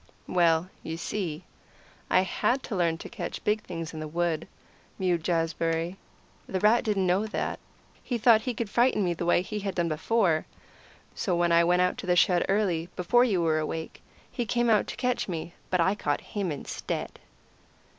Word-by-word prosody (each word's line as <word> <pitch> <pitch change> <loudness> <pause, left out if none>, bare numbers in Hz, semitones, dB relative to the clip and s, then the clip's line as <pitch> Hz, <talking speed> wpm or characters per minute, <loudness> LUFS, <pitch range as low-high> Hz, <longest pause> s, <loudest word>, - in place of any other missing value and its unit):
"Well, 170 -1 +3
you 160 - -5
see, 170 -2 -3 0.7
I - - +5
had 245 +7 0
to 215 - -4
learn 170 -3 +1
to - - -8
catch - - -6
big 210 +1 +1
things 165 -4 -6
in 160 - -6
the 155 - -4
wood," 165 0 -1 0.5
mewed 175 -3 0
Jazbury. 165 0 0 0.5
"The 190 - -2
rat 215 +4 +4
didn't 205 -4 +1
know 185 +4 +2
that; 215 - -3 0.4
he 245 - -2
thought 225 -1 +5
he 245 +1 -3
could 230 - -2
frighten 235 0 +2
me 175 -2 +1
the 170 0 -4
way 175 - +4
he 210 +3 -4
had 195 -2 -4
done 170 -1 0
before. 160 0 +1 0.7
So 180 - -1
when 175 0 +2
I 170 0 +6
went 180 +1 +3
out 180 - 0
to 185 - -6
the 180 - +3
shed 175 0 +4
early 185 -5 +1
before 240 +7 +3
you 195 -8 +1
were 160 -1 +2
awake 160 +1 -5 0.3
he 245 - -2
came 240 +2 +2
out 210 -2 +3
to - - -5
catch 250 -1 -1
me; 170 -1 -5 0.2
but 185 - +1
I 190 +3 +3
caught 145 -8 -1
him, 200 -5 -3
instead." 145 - -5
180 Hz, 190 wpm, -27 LUFS, 165-210 Hz, 0.7 s, I